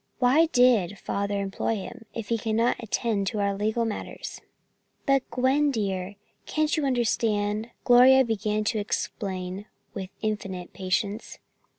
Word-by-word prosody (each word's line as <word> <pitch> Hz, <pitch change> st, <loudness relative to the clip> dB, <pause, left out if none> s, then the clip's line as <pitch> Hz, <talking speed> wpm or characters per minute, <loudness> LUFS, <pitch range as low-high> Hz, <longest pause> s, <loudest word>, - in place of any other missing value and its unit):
"Why 270 Hz, +6 st, +4 dB
did 245 Hz, -, +3 dB
Father 200 Hz, +2 st, -2 dB
employ 200 Hz, +3 st, -1 dB
him, 220 Hz, +2 st, -8 dB
if 225 Hz, -3 st, -6 dB
he 230 Hz, -, +2 dB
cannot 225 Hz, +2 st, +1 dB
attend 215 Hz, -2 st, -1 dB
to 210 Hz, -, -2 dB
our 200 Hz, 0 st, +1 dB
legal 220 Hz, +3 st, 0 dB
matters?" 220 Hz, -, -6 dB, 0.6 s
"But, 275 Hz, -1 st, +4 dB
Gwen, 260 Hz, +4 st, +2 dB
dear, 200 Hz, -5 st, -2 dB, 0.3 s
can't 310 Hz, 0 st, +1 dB
you 305 Hz, -3 st, 0 dB
understand?" 220 Hz, -3 st, 0 dB
Gloria 260 Hz, +2 st, +7 dB
began 215 Hz, -1 st, -1 dB
to 215 Hz, +1 st, 0 dB
explain 195 Hz, -1 st, -3 dB, 0.3 s
with 190 Hz, -2 st, -5 dB
infinite 195 Hz, -4 st, -3 dB
patience. 200 Hz, +3 st, -2 dB
215 Hz, 130 wpm, -26 LUFS, 200-245 Hz, 0.6 s, Gloria